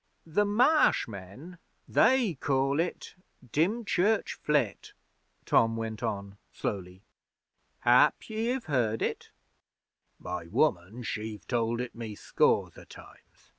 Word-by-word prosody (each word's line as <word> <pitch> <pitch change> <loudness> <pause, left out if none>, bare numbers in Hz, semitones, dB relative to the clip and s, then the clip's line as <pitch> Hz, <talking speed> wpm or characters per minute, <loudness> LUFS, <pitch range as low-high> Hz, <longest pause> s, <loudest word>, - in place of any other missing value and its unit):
'The 185 +6 +1
Marsh 250 +10 +3
men 115 - -10 0.3
they 235 -4 +3
call 135 0 0
it 170 +2 -3 0.4
Dymchurch 200 +4 +1
Flit,' 140 - 0 0.5
Tom 115 0 +3
went 110 -1 -4
on 100 -3 -4
slowly. 95 -1 -5 0.8
'Hap 120 +1 +4
you 225 +2 -1
have 260 -3 -4
heard 120 -7 0
it?' - - -3 0.9
'My 90 -2 -6
woman 110 - 0
she've 110 -1 -5
told 115 -1 0
it 125 -1 -4
me 115 -3 -7
scores - - +1
o' - - -12
times. - - -17
125 Hz, 115 wpm, -29 LUFS, 105-180 Hz, 0.9 s, Hap